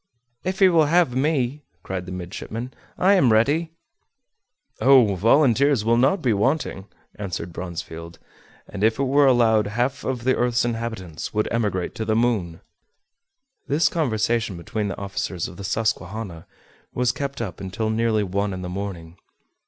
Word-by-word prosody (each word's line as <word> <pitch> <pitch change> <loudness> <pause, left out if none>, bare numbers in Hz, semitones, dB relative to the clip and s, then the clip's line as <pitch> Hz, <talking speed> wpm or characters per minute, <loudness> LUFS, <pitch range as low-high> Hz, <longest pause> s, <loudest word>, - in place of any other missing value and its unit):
"If 185 +1 -2
he 190 - +6
will 165 -3 +4
have 170 -4 +3
me," 140 0 0 0.2
cried 95 -1 -5
the - - -6
midshipman, 100 +7 -6 0.2
"I 190 +2 +4
am 155 - +4
ready!" 145 +10 +2 1.1
"Oh! 130 -6 +6
volunteers 125 - +3
will 115 +1 +4
not 135 +10 +2
be 120 -4 +3
wanting," 105 -3 -1 0.3
answered 90 -4 -5
Bronsfield; 85 -2 -7 0.5
"and 100 0 -5
if 110 0 +3
it 140 - 0
were 140 +1 +4
allowed, 115 -4 +4
half 120 +6 -1
of 125 -3 -3
the 130 +1 +2
earth's 120 -1 +1
inhabitants 115 -8 -4
would 105 - +1
emigrate 105 -6 -1
to 110 - -4
the 110 - +1
moon!" 110 -8 0 1.1
This 150 +4 +2
conversation 115 - 0
between 105 +5 -3
the 95 - -4
officers 95 -3 -3
of 90 - -11
the 100 - -7
Susquehanna 100 -4 -3 0.5
was 125 -1 +2
kept 140 0 -5
up 100 -8 -5
until 100 +3 -2
nearly 110 -1 +1
one 100 +1 -1
in 90 - -6
the 90 - -5
morning. 90 -3 -6
110 Hz, 155 wpm, -23 LUFS, 95-130 Hz, 1.1 s, he